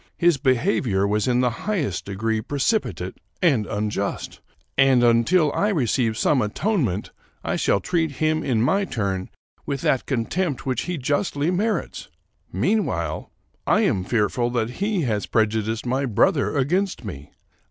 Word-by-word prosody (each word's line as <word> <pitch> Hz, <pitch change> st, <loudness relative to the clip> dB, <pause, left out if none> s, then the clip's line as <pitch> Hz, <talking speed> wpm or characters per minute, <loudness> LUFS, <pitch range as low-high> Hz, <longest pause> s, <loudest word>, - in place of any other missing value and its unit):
His 175 Hz, -3 st, +3 dB
behavior 130 Hz, -, +1 dB
was 105 Hz, +2 st, 0 dB
in 125 Hz, 0 st, +2 dB
the 125 Hz, -, +3 dB, 0.2 s
highest 155 Hz, -, -1 dB
degree 110 Hz, +3 st, -1 dB
precipitate 145 Hz, -, -1 dB, 0.2 s
and 135 Hz, -, +2 dB
unjust, 105 Hz, -1 st, -3 dB, 0.3 s
and, 135 Hz, -2 st, +4 dB
until 140 Hz, +7 st, +3 dB
I 205 Hz, -, +1 dB
receive 125 Hz, -, +1 dB
some 140 Hz, +1 st, +2 dB
atonement, 110 Hz, -, -1 dB, 0.3 s
I -, -, -1 dB
shall 100 Hz, -, +2 dB
treat 160 Hz, -, -1 dB
him, 155 Hz, +3 st, 0 dB
in 115 Hz, -5 st, +1 dB
my 195 Hz, +11 st, +2 dB
turn, 100 Hz, -, -2 dB, 0.4 s
with 140 Hz, -2 st, -2 dB
that 130 Hz, -, +1 dB
contempt 140 Hz, +4 st, -1 dB
which 130 Hz, -3 st, -1 dB
he 180 Hz, -, -1 dB
justly 145 Hz, +3 st, 0 dB
merits; 200 Hz, +1 st, -2 dB, 0.4 s
mean 200 Hz, -, +1 dB
while, 85 Hz, -2 st, -3 dB, 0.4 s
I -, -, +4 dB
am 95 Hz, -, +1 dB
fearful 120 Hz, +3 st, 0 dB
that 115 Hz, 0 st, 0 dB
he 205 Hz, -2 st, +1 dB
has 105 Hz, -5 st, -1 dB
prejudiced 110 Hz, +1 st, 0 dB
my 130 Hz, +3 st, 0 dB
brother 140 Hz, -, +2 dB
against 175 Hz, -, 0 dB
me. 75 Hz, -8 st, -8 dB
130 Hz, 145 wpm, -23 LUFS, 110-160 Hz, 0.4 s, and